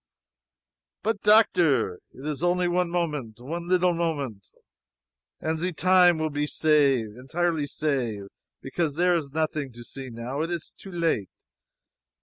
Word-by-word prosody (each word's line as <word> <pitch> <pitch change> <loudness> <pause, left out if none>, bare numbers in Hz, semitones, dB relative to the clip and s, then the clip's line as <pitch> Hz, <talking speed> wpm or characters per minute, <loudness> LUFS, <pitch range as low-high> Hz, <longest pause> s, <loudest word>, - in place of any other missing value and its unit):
"But 220 -2 -1
doctor! 170 - +4
It 135 - -12
is 150 -1 -3
only 175 0 +2
one 175 0 +1
moment 150 -11 -2
one 170 +7 -5
leetle 180 -1 +3
moment. 145 - -3 0.9
And 160 0 -2
ze 180 +2 -1
time 180 0 +5
will 155 -1 -1
be 145 +1 -1
save 140 -9 +2
entirely 155 +4 -1
save! 130 -9 -1 0.4
Because 150 +2 -2
zere 180 +2 +3
is 160 -5 -1
nothing 155 -2 -2
to 120 0 -10
see 130 +2 -8
now 120 +5 -4
it 165 - -2
is 170 -2 -4
too 195 - -11
late. 165 - 0
155 Hz, 140 wpm, -26 LUFS, 135-175 Hz, 0.9 s, time